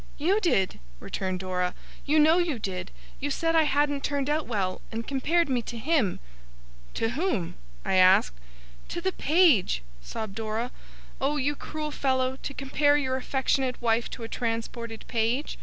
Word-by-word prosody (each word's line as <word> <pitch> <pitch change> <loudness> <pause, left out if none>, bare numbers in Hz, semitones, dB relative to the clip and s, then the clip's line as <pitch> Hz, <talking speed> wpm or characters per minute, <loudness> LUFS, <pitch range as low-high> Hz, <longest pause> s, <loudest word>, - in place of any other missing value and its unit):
'You 365 +8 +2
did,' 195 - +1 0.2
returned 185 - -3
Dora. 180 -1 -1 0.3
'You 300 +2 +3
know 315 +3 +6
you 335 -7 0
did. 185 -3 -4 0.3
You 290 - -2
said 330 +3 0
I 320 -1 +5
hadn't 290 -1 +1
turned 285 0 0
out 305 0 0
well, 195 -5 -1
and 225 0 -4
compared 315 +6 +1
me 255 -3 +1
to 235 0 -7
him.' 265 - +1 0.8
'To 225 - 0
whom?' 245 - -1 0.3
I 190 - +2
asked. 185 - +6 0.6
'To - - -3
the 375 +2 0
page,' 295 - +3 0.2
sobbed 195 - -5
Dora. 225 +3 -3 0.5
'Oh, 285 +3 +1
you 290 +1 0
cruel 305 +1 -5
fellow, 260 -2 0
to 275 - -5
compare 290 +2 +2
your 260 -3 0
affectionate 265 0 0
wife 230 -1 +1
to 235 - -7
a - - -4
transported 230 0 -4
page! 235 +5 -1
260 Hz, 160 wpm, -27 LUFS, 225-295 Hz, 0.8 s, know